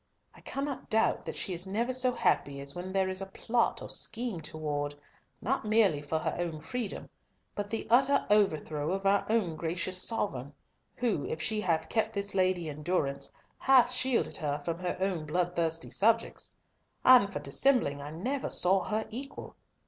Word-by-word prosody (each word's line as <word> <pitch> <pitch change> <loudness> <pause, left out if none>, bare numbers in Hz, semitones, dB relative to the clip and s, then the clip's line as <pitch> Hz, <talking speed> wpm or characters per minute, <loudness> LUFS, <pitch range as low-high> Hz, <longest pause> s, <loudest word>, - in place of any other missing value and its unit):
I - - -17
cannot 275 0 -4
doubt 220 +1 +2
that - - -5
she 190 - -1
is 175 +2 -2
never 230 +6 -1
so 255 0 +3
happy 140 - 0
as 140 0 -2
when 180 +1 -6
there 190 0 +1
is 185 0 -3
a 195 - -5
plot 235 +4 0
or - - -8
scheme 225 -6 +2
toward, 145 -2 -3 0.5
not 265 +6 0
merely 210 -8 +3
for 145 +2 -2
her - - -2
own 170 -3 -3
freedom, 230 +7 -4 0.5
but 205 0 -4
the 225 +1 -3
utter 265 +4 +4
overthrow 155 -6 +1
of 195 0 -3
our 200 +1 +3
own 210 -8 +1
gracious 175 +3 -1
Sovereign, 150 - -2 0.4
who, 230 - -1
if 160 - -4
she 210 +6 -1
hath 170 -5 0
kept 220 -1 0
this 200 -1 -3
lady 185 -3 +1
in 150 0 -7
durance, 140 -5 -1 0.3
hath 255 -2 +5
shielded 255 -1 +1
her 145 -3 -2
from 170 0 -2
her 180 0 -3
own 185 -5 -1
bloodthirsty 170 0 -1
subjects. 225 +2 +1 0.5
And 245 -6 +7
for - - -4
dissembling, 240 - +1
I 145 - -7
never 245 - -3
saw 190 +2 +3
her 215 +1 -1
equal. 270 +5 -8
190 Hz, 175 wpm, -30 LUFS, 160-225 Hz, 0.5 s, And